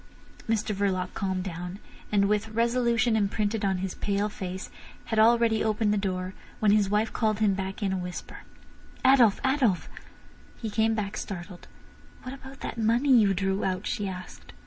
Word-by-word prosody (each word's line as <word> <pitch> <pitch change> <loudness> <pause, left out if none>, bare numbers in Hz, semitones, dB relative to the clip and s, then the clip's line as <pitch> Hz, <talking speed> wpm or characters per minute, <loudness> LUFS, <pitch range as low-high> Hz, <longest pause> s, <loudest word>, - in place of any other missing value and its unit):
Mr 220 -1 0
Verloc 190 -2 -1
calmed 190 -2 -2
down, 180 0 -6 0.3
and, 200 -1 +3
with 210 +1 0
resolution 235 0 +2
imprinted 210 +1 0
on 190 -1 +1
his 190 0 -3
pale 205 +1 -1
face, 185 -2 -6 0.3
had 220 - 0
already 230 0 +4
opened 215 -1 +1
the - - +2
door, 185 -2 -2 0.2
when 210 -2 +3
his 205 -2 +3
wife 210 +2 +1
called 215 -2 +1
him 210 -2 +3
back 190 +2 -4
in 195 -1 0
a - - -1
whisper: 180 -1 -6 0.7
"Adolf! 250 -6 +6
Adolf!" 260 - +2 0.7
He 220 -3 -4
came 220 +1 +2
back 205 -2 -3
startled. 180 -2 -7 0.6
"What 255 - -6
about 270 0 -11
that 230 - -5
money 240 +5 +4
you 205 -4 +4
drew 195 +1 0
out?" 185 +1 -1
she 205 - -2
asked. 185 -1 -9
210 Hz, 170 wpm, -27 LUFS, 190-225 Hz, 0.7 s, Adolf